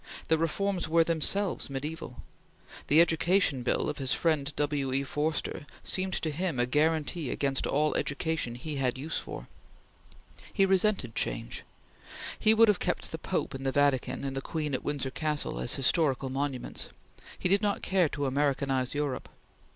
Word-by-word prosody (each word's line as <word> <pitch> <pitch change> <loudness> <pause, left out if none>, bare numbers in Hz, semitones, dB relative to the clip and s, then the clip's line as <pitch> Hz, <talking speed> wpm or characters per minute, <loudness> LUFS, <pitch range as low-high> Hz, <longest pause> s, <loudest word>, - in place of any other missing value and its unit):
The 160 - +4
reforms 180 +2 0
were 165 +1 +5
themselves 170 +4 0
mediaeval. 140 -1 -5 0.6
The 150 - +5
Education 170 -3 +3
Bill 120 - +1
of - - -3
his 135 -1 +1
friend 150 -4 +1
W. 145 -2 0
E. 135 +1 +1
Forster 150 0 -2 0.2
seemed 185 0 0
to 160 - -1
him 165 -3 -2
a 120 - +3
guaranty 155 +2 +1
against 135 -1 0
all 150 +2 +2
education 140 -4 -1
he 145 +4 -5
had 130 -2 0
use 155 +5 -2
for. - - -8 1.0
He 195 - +3
resented 190 - +2
change. - - -1 0.8
He 220 +1 +5
would 230 +1 +7
have 210 -3 +3
kept - - -2
the - - -5
Pope - - -2
in 135 - -6
the 135 0 0
Vatican 135 -2 +1
and 135 -1 -3
the 135 - -2
Queen 150 -1 -3
at 130 - -1
Windsor 140 -2 -2
Castle 150 - -2
as 60 - -1
historical 135 -2 +1
monuments. 135 -2 -1 0.5
He - - 0
did 195 +2 +4
not 205 -2 0
care 185 -4 +2
to 145 -1 -3
Americanize 135 -1 0
Europe. 145 -3 -2
150 Hz, 165 wpm, -29 LUFS, 135-165 Hz, 1.0 s, would